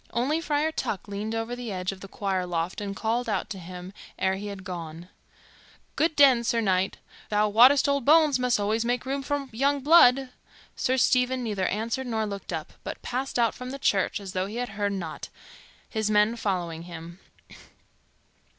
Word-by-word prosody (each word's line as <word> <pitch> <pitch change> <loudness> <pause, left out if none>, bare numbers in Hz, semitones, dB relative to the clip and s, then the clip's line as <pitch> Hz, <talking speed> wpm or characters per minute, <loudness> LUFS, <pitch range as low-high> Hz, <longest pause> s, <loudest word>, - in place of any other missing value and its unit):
Only 275 +8 0
Friar 305 0 0
Tuck 205 - -3
leaned 205 +2 -4
over 225 +2 -3
the 245 -3 -6
edge 185 0 -2
of 195 -1 -11
the 195 - -8
choir 190 -2 -2
loft 170 +2 -2
and 200 -1 -4
called 230 +4 -1
out 200 -1 -2
to 195 - -5
him 180 +1 -9 0.2
ere 190 - +1
he 200 +2 -5
had 200 -2 -7
gone, 170 -1 -7 0.9
"Good 320 0 +1
den, 265 -5 +6
Sir 235 0 +1
Knight. 190 -3 +1 0.3
Thou 210 0 +2
wottest 255 +7 +6
old 280 -1 +1
bones 300 -1 +5
must 250 -3 +2
alway 210 +2 0
make 245 +2 -1
room 275 +1 -2
for 285 0 -2
young 275 +5 +1
blood." 270 -3 +6 0.5
Sir 260 +1 0
Stephen 250 0 +2
neither 205 -5 -1
answered 230 +5 -2
nor 220 -2 -1
looked 200 -3 -6
up, 160 -2 -5
but - - -6
passed 260 +2 -3
out 230 -2 +2
from 250 0 -8
the 275 - -5
church 200 -5 +1
as 195 -2 -8
though 185 +1 -1
he 210 - -8
had 245 0 -2
heard 205 0 -2
nought, 170 -5 -6 0.6
his 220 -2 -2
men 210 +2 +3
following 175 -7 -2
him. 170 +1 -9
220 Hz, 185 wpm, -26 LUFS, 190-255 Hz, 0.9 s, den